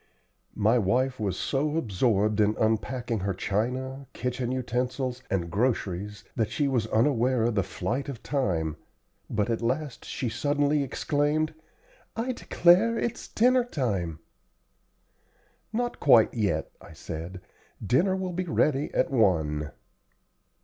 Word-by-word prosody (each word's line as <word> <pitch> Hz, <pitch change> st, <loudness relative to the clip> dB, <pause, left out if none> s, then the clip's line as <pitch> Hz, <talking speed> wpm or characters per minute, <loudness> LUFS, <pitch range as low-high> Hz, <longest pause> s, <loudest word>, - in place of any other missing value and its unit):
My 110 Hz, +4 st, +3 dB
wife 125 Hz, +5 st, +1 dB
was 100 Hz, -4 st, -1 dB
so 150 Hz, +3 st, 0 dB
absorbed 105 Hz, -, +1 dB
in 105 Hz, 0 st, +3 dB
unpacking 115 Hz, +1 st, 0 dB
her 95 Hz, -1 st, -2 dB
china, 130 Hz, +8 st, -2 dB
kitchen 125 Hz, 0 st, -2 dB
utensils, 125 Hz, 0 st, -2 dB
and 85 Hz, -3 st, -1 dB
groceries 105 Hz, -2 st, -1 dB
that 110 Hz, -3 st, 0 dB
she 145 Hz, +5 st, 0 dB
was 120 Hz, -5 st, 0 dB
unaware 125 Hz, +1 st, +2 dB
of 120 Hz, +1 st, +1 dB
the 100 Hz, -, +2 dB
flight 120 Hz, +10 st, -3 dB
of 130 Hz, -5 st, -7 dB
time, 85 Hz, -, -1 dB, 0.5 s
but 110 Hz, +1 st, 0 dB
at 115 Hz, -, -1 dB
last 130 Hz, +3 st, -2 dB
she 125 Hz, -, -3 dB
suddenly 145 Hz, +5 st, +1 dB
exclaimed, 150 Hz, +3 st, 0 dB, 0.6 s
"I 235 Hz, +3 st, -1 dB
declare 225 Hz, 0 st, +4 dB
it's 235 Hz, 0 st, -3 dB
dinner 250 Hz, +2 st, +3 dB
time!" 100 Hz, -, -2 dB, 1.5 s
"Not 240 Hz, +2 st, -2 dB
quite 120 Hz, -6 st, +6 dB
yet," 105 Hz, -4 st, -1 dB
I -, -, -13 dB
said; 85 Hz, +3 st, -7 dB, 0.5 s
"dinner 175 Hz, -, +3 dB
will 185 Hz, -1 st, -3 dB
be 185 Hz, +1 st, -2 dB
ready 150 Hz, -3 st, +1 dB
at -, -, +2 dB
one." 80 Hz, -, +2 dB
125 Hz, 130 wpm, -27 LUFS, 105-145 Hz, 1.5 s, quite